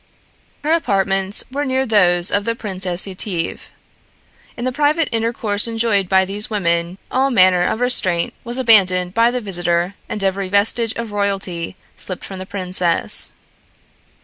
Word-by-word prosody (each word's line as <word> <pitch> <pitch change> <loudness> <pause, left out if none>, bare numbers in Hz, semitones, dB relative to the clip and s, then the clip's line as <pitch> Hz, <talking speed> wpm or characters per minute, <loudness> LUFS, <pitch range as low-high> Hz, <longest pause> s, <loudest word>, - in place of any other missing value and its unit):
Her 310 +2 +1
apartments 195 - 0
were 285 +2 -2
near 265 -1 0
those 180 -6 +3
of 205 0 +1
the 230 +2 -1
Princess 190 -5 -2
Yetive. 185 -3 -3 0.9
In 240 - -4
the 255 - 0
private 300 +3 +1
intercourse 225 -2 +1
enjoyed 225 -5 0
by 190 0 +4
these 205 +2 -2
women, 170 -4 -1
all 265 +1 +2
manner 185 -6 +4
of 220 +6 -1
restraint 185 -9 +2
was 240 0 -5
abandoned 185 -7 +4
by 230 +2 +4
the 250 0 -2
visitor 175 -2 -1 0.2
and 210 - -4
every 195 0 -1
vestige 220 +3 +2
of 230 -2 -5
royalty 195 -4 -2 0.2
slipped 185 - -5
from 190 -1 -8
the 185 - -7
princess. 180 -3 0
200 Hz, 150 wpm, -18 LUFS, 185-230 Hz, 0.9 s, by